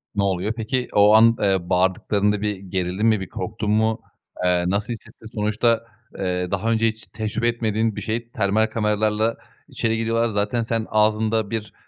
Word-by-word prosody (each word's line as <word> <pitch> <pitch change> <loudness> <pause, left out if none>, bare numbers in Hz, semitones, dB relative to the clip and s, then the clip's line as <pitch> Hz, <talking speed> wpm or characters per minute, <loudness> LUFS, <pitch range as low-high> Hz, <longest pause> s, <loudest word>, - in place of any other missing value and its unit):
Ne 100 - +1
oluyor 95 +2 0
peki? 125 +2 -2
O 105 +1 +6
an, 115 +1 +6
eee, 95 -3 +1
bağırdıklarında 100 +3 +1
bir 105 -1 -1
gerildin 95 +1 -2
mi, 110 -2 +4
bir 95 - -6
korktun 105 -1 -3
mu? 110 +1 +1 0.4
Eee, 90 -1 +2
nasıl 100 +5 -1
hissettin? 110 - -13
Sonuçta, 110 +2 +1 0.4
eee, 90 -1 -2
daha 110 +4 0
önce 115 0 +2
hiç 110 0 -4
tecrübe 110 +2 -2
etmediğin 110 -2 0
bir - - -5
şey, 115 +2 -3
termal 110 -2 +1
kameralarla 110 0 0 0.3
içeri 115 0 -1
giriyorlar. 115 +1 +1
Zaten 105 +4 0
sen, 115 -1 -1
ağzında 110 0 +1
bir, 110 -1 -4
110 Hz, 165 wpm, -22 LUFS, 100-115 Hz, 0.4 s, O